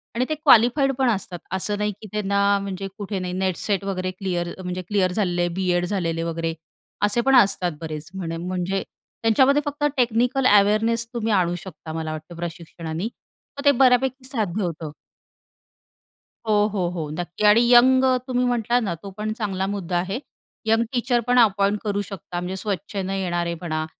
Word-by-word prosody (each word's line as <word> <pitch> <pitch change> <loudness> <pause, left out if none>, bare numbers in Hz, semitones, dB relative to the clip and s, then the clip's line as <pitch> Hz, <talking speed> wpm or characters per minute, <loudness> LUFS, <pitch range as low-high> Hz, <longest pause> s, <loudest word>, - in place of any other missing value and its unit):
आणि 250 +2 +1
ते 310 - 0
क्वालिफाईड 275 -2 +5
पण 260 -2 +3
असतात 190 -5 -2
असं 205 +2 -1
नाही 210 0 0
की 215 - -9
त्यांना 200 -1 -1 0.2
म्हणजे 195 -1 -5
कुठे 200 -1 -4
नाही 180 -1 -4
नेट-सेट 190 +1 -1
वगैरे 185 -1 -2
क्लिअर 185 -2 -3 0.2
म्हणजे 180 0 -3
क्लिअर 195 -3 +1
झालेले 175 -3 0
बी.एड 180 -2 +1
झालेले 170 -4 -1
वगैरे 165 0 -2 0.5
असे 205 +3 +1
पण 270 - +6
असतात 190 -5 +4
बरेच. 155 -1 -6
म्हणे 165 -3 -4
म्हणजे 185 +2 -2 0.4
त्यांच्यामध्ये 265 +6 +4
फक्त 290 0 -4
टेक्निकल 250 +2 +2
अवेअरनेस 225 +3 +2
तुम्ही 225 -2 -1
आणू 175 -3 +2
शकता 160 -3 -9
मला 160 -1 -3
वाटतं 155 +2 -8
प्रशिक्षणाने 170 0 -5
मग 280 +4 -11
ते 285 - +8
बऱ्यापैकी 260 0 +3
साध्य 215 -6 -2
होतं. 165 -3 -4 1.6
हो, 215 - +3 0.2
हो, 185 -4 0
हो. 165 -4 -4
नक्की. 175 +3 -5
आणि 230 +3 +6
यंग 260 +2 +7 0.2
तुम्ही 250 -1 +1
म्हटलात 245 0 +1
ना 195 -5 -1
तो 200 - -6
पण 215 +1 -2
चांगला 195 -4 -2
मुद्दा 190 -3 -2
आहे. 190 +6 -2 0.5
यंग 225 +1 +3
टीचर 245 0 +1
पण 245 0 +4
अपॉइंट 205 -2 +3
करू 205 -1 -1
शकता 180 -3 -6
म्हणजे 180 +2 -4
स्व:इच्छेने 195 -2 -3
येणारे 175 -2 -1
म्हणा 155 -2 -3
195 Hz, 165 wpm, -23 LUFS, 175-230 Hz, 1.6 s, ते